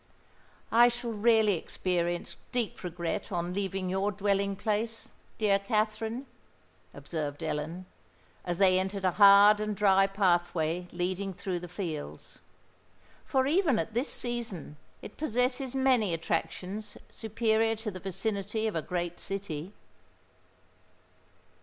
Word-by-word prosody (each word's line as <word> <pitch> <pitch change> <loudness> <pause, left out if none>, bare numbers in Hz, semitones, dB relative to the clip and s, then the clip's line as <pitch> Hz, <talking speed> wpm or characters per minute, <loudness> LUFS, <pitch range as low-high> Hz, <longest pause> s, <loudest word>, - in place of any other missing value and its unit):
"I 235 +2 +7
shall 240 -1 -2
really 220 -1 +4
experience 175 +1 -2 0.2
deep 240 -4 -2
regret 175 -1 -3
to 180 - -3
leave 190 +3 -2
your 190 +2 0
dwelling 200 0 0
place, 220 +2 -2 0.2
dear 200 -2 +3
Katherine," 220 +4 -1 0.7
observed 150 -2 -5
Ellen, 160 +4 -3 0.6
as 175 -1 -2
they 185 -1 +5
entered 190 +1 -2
a 185 - +4
hard 200 +2 +7
and 215 -1 -2
dry 195 -1 +4
pathway 175 -3 +1
leading 185 +2 -2
through 180 -1 -3
the 175 - -8
fields; 170 -4 -6 0.9
"for 265 -2 +1
even 310 - +3
at 220 - -2
this 245 +5 0
season, 235 - -3 0.3
it - - -10
possesses 250 -1 0
many 250 -9 +3
attractions 180 +5 -3
superior 225 0 0
to 220 0 -5
the 185 - -8
vicinity 200 +3 -2
of 220 - -1
a 165 - 0
great 175 +1 -3
city." 190 -4 -4
200 Hz, 120 wpm, -29 LUFS, 180-220 Hz, 0.9 s, I